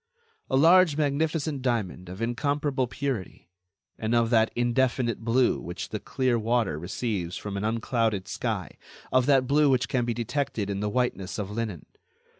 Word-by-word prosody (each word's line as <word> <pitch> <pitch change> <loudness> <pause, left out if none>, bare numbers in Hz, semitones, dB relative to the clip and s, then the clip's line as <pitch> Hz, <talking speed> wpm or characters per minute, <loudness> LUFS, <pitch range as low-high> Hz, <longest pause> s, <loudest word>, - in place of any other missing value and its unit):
A 130 - +2
large 165 +1 +6
magnificent 150 0 0
diamond 105 -8 -2
of 95 +5 -5
incomparable 140 +2 0
purity, 120 -10 -4 0.5
and 110 +2 0
of 115 0 +2
that 110 -1 +4
indefinite 120 -1 +1
blue 120 +2 +2
which 85 +1 -6
the - - -4
clear 125 -3 0
water 110 -8 0
receives 90 0 -3
from 105 -1 -5
an 100 - -3
unclouded 110 -3 0
sky, - - -3 0.3
of 130 0 +3
that 135 -3 +4
blue 145 +2 +4
which 130 -2 +2
can 130 -3 0
be 120 -1 -1
detected 115 -3 -2
in 100 - -2
the 105 +1 -1
whiteness 115 -5 -1
of 105 -2 -4
linen. 105 -6 -4
120 Hz, 160 wpm, -27 LUFS, 105-135 Hz, 0.5 s, large